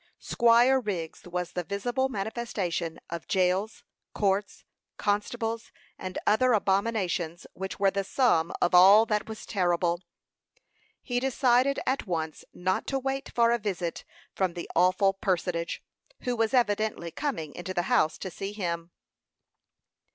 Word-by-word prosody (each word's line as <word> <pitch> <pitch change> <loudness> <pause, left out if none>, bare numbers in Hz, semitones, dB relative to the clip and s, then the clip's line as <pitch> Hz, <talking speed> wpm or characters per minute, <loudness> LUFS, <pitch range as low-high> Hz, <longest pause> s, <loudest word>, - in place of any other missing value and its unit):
Squire 240 +3 +4
Wriggs 185 -9 -5
was 180 0 -3
the 180 - -3
visible 245 +8 -1
manifestation 195 -7 -3
of 170 -1 -5
jails, 190 +3 0 0.3
courts, 200 0 0 0.3
constables, 225 +2 -2 0.2
and 185 -1 -6
other 250 +4 +4
abominations, 190 -5 0
which 190 +1 -6
were 195 -1 +4
the 200 0 -1
sum 190 -7 +2
of 175 - +2
all 195 +5 +8
that 210 -1 -1
was 220 -1 -7
terrible. 175 -3 +1 1.0
He 245 -2 -1
decided 260 +1 +2
at 260 -4 -1
once 160 -3 -3
not 185 +1 -1
to 270 - 0
wait 270 +1 -3
for 235 -1 +4
a 235 - +2
visit 185 -5 -3 0.3
from 185 -2 -1
the 170 - -5
awful 185 +3 +4
personage, 180 -3 -2 0.4
who 250 -1 -1
was 225 -1 +1
evidently 215 -7 +1
coming 165 - -3
into 175 +1 -6
the 175 - +1
house 240 -10 +2
to 190 - -6
see 195 +4 -5
him. 170 -4 -3
200 Hz, 135 wpm, -28 LUFS, 175-230 Hz, 1.0 s, all